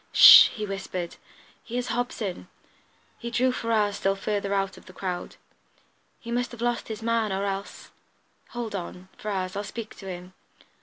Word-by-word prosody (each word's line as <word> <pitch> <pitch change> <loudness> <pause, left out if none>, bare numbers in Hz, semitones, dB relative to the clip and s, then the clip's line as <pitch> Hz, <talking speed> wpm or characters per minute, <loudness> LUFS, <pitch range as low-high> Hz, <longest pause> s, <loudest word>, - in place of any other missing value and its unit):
"H'sh!" - - +11
he 215 -2 -5
whispered. 195 -3 -5 0.5
"Here's 245 +1 -3
Hobson!" 215 - -3 0.7
He 235 - -5
drew 250 +2 +2
Ferrars 215 -4 0
still 195 0 +1
further 200 0 -2
out 195 -1 0
of - - -16
the 185 - -12
crowd. 180 -2 -4 0.8
"He 235 - -8
must 245 +1 -1
have 240 - -10
lost 240 0 -1
his 220 0 -6
man, 230 -2 +1
or 195 +1 -1
else 195 0 -5 0.6
hold 235 -3 -5
on, 185 0 -6
Ferrars; 190 -3 -3
I'll 205 - -2
speak 225 +1 -7
to 195 - -10
him." 180 0 -7
205 Hz, 160 wpm, -26 LUFS, 190-230 Hz, 0.8 s, H'sh